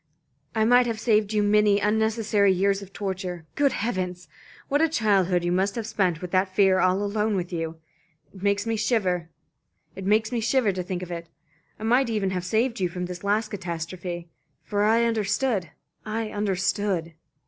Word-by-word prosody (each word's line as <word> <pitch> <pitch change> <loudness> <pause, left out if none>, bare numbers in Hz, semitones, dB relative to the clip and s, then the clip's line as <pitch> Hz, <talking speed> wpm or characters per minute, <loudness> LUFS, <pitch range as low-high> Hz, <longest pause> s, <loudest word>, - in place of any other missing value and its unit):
I 220 0 +3
might 245 +1 +5
have 225 -2 -2
saved 215 -3 +2
you 210 -1 +2
many 205 0 +4
unnecessary 210 -1 +2
years 195 +2 +1
of 195 -1 -11
torture. 190 -4 -4
Good 285 -1 +2
heavens! 180 -6 -3 0.4
what 290 +2 +1
a 325 - +4
childhood 195 - +2
you 175 - 0
must 190 +2 +1
have 230 -2 -3
spent 185 -6 0
with 180 - -5
that 185 0 +2
fear 190 -2 +4
all 185 +2 +2
alone 210 +1 0
with 180 -1 -3
you. 165 -1 -3 0.6
It 190 - -13
makes 200 +1 +1
me 225 0 0
shiver 185 -7 0 0.6
to 220 +1 +1
think 180 0 -4
of 180 - -8
it. 170 -1 -6 0.5
I - - -9
might 245 +3 +3
even 205 -4 0
have 180 -1 -2
saved 230 +5 0
you 180 -2 +1
from 180 +1 -4
this 180 +1 -7
last 210 +2 +1
catastrophe. 175 -2 -5 0.4
For 205 -1 -1
I 225 +2 +4
understood. 215 - 0 0.3
I 220 0 -3
understood." 195 -3 -1
200 Hz, 170 wpm, -25 LUFS, 180-220 Hz, 0.6 s, might